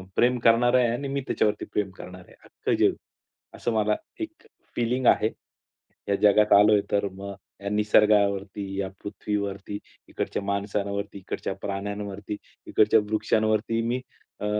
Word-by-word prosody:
प्रेम 125 +1 +3
करणार 115 +2 +4
आहे 125 -1 +5
आणि 140 +4 -3
मी 140 0 -1
त्याच्यावरती 105 -1 0
प्रेम 105 -2 0
करणार 90 0 -9
आहे - - -18
अख्खं - - -2
जग. - - +4 0.6
असं 120 - -2
मला 105 -1 +2 0.3
एक 325 +3 -6 0.3
फीलिंग 125 +2 0
आहे. 110 - +5 0.8
या 100 - +3
जगात 105 0 +5
आलोय 105 0 +6
तर 100 0 +2
मग 100 +1 -7 0.3
या 100 - -3
निसर्गावरती, 105 -1 +3 0.2
या 95 - -1 0.2
पृथ्वीवरती, 100 -1 -3 0.3
इकडच्या - - -3
माणसांवरती, 100 0 -2
इकडच्या 95 - -4
प्राण्यांवरती, 100 0 -4 0.3
इकडच्या 110 +1 +4
वृक्षांवरती 110 +1 +1
मी 125 +2 -1 0.4
अ, - - -2
105 Hz, 135 wpm, -26 LUFS, 100-110 Hz, 0.8 s, आलोय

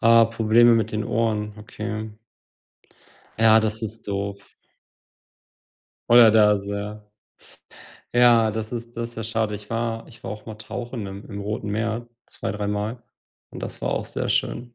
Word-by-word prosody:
Ah, 115 0 +6
Probleme 115 +1 +5
mit 110 -1 -1
den 110 0 -1
Ohren, 105 -2 -1
okay. 110 +1 -5 1.3
Ja, 110 0 +7
das 110 0 -2
ist 110 0 -6
doof. 100 0 -4 1.6
Oder 115 -2 +8
das, 105 -2 +4
ja. 100 +1 -4 1.1
Ja 120 -2 +6
das 110 +1 -5
ist 120 0 -6
das 115 0 -4
ja 115 - -5
schade. 110 -1 -1
Ich 105 0 -9
war 115 0 -2
ich 115 - -17
war 95 - -3
auch 105 0 -10
mal 110 -2 -8
tauchen 115 +1 -6
im 95 +1 -8
im 100 -1 -5
Roten 105 0 -4
Meer 115 +3 -2 0.2
2, - - -5
dreimal 105 +3 -3 0.5
und - - -9
das - - -6
war - - -1
auch - - -2
sehr - - -3
schön. 120 0 -1
110 Hz, 155 wpm, -24 LUFS, 105-115 Hz, 1.6 s, Oder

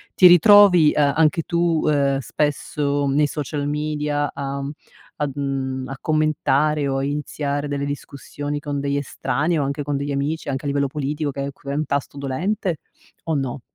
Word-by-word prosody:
ti 185 - +5
ritrovi, 180 -2 +7
ehm, 145 -2 +2
anche 160 +1 +3
tu, 170 -1 +1
uhm, 140 -2 +2
spesso 145 +2 -1
nei 150 - +4
social 145 0 -3
media, 150 -1 -1
uhm, 140 0 -4 0.5
a, 150 -1 -1
uhm 135 -2 -3
a 135 - -6
commentare 155 -1 +1
o 135 - -1
a 135 - -1
iniziare 145 0 -2
delle 140 -1 -3
discussioni 145 +1 -5
con 145 -2 -3
degli 140 0 -1
estranei 145 +3 -1
o 145 - +1
anche 140 +1 -2
con 145 0 -2
degli 140 +1 -3
amici 145 +4 -2
anche 135 0 -3
a - - -3
livello 140 0 +1
politico 145 +2 -3
che 140 0 -4
è 140 - -4
q 140 - -19
è 140 - -2
un 150 +2 -1
tasto 140 0 -3
dolente 170 +7 -2 0.5
o 160 - 0
no? 135 -2 -3
145 Hz, 180 wpm, -22 LUFS, 140-155 Hz, 0.5 s, ritrovi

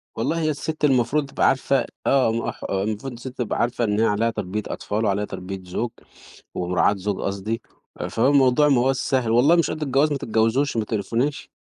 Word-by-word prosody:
والله 160 +9 -1
هي 155 - +1
السِت 155 +1 -2
المفروض 135 +2 +2
تبقى - - +2
عارفة 135 -1 +2 0.2
آه، 130 -4 +4
م 115 +1 -2
ح - - -15
المفروض 105 +6 -2
السِت 125 +2 -9
تبقى 120 -4 -2
عارفة 120 0 0
إن 105 -1 +1
هي 115 - +4
عليها 110 +2 +1
تربية 105 -1 -3
أطفال 110 +2 -2
وعليها 100 0 +1
تربية 95 -1 -7
زُوج 110 +6 -3 0.7
ومراعاة 90 +3 +2
زُوج 100 0 -3
قصدي، 100 +3 -3 0.5
فهو 115 +4 +2
الموضوع 140 +1 +4
ما 135 - +4
هواش 135 +1 +2
سهْل، 130 -5 0
والله 135 +8 +5
مش 170 - +2
قد 155 - -4
الجواز 140 +2 +2
ما 145 - 0
تتجاوزوش 115 +3 +1
ما 110 - 0
تقريفوناش. 115 +7 -2
115 Hz, 190 wpm, -23 LUFS, 105-135 Hz, 0.7 s, والله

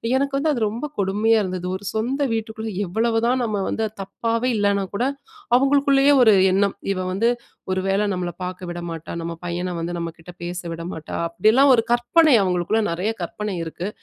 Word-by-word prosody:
எனக்கு 275 +1 0
வந்து 305 +2 +1
அது 250 - -1
ரொம்ப 235 +7 -5
கொடுமையா 210 +4 +2
இருந்தது. 180 -1 -4
ஒரு 190 - -7
சொந்த 250 +6 -1
வீட்டுக்குள்ள 220 0 -4
எவ்வளவுதான் 230 +6 +1
நம்ம 215 -3 -1
வந்து 225 - -1 0.2
தப்பாவே 230 +5 -1
இல்லனா 200 -1 +2
கூட, 245 - +1 0.5
அவுங்களுக்குள்ளயே 275 +1 +4
ஒரு 220 -3 +7 0.2
எண்ணம். 200 +1 +2 0.2
இவ 185 - -4
வந்து 215 +6 +2 0.4
ஒரு 185 0 0
வேள 195 +2 +2
நம்மள 180 -1 -3
பார்க்க 180 -1 -5
விடமாட்டா! 170 -2 -6
நம்ம 170 0 -4
பையன 175 +1 -3
வந்து 170 +1 -3
நம்மக்கிட்ட 170 +1 -7
பேச 175 +1 -4
விட 165 0 -7
மாட்டா! 160 -1 -7
அப்பிடியெல்லாம் 220 +11 +4
ஒரு 225 - +2
கற்பனை 275 +5 +4
அவுங்களுக்குள்ள 180 +4 +1
நிறைய 180 +6 -1
கற்பனை 205 +3 -4
இருக்கு. 170 +4 -5
205 Hz, 165 wpm, -22 LUFS, 180-235 Hz, 0.5 s, ஒரு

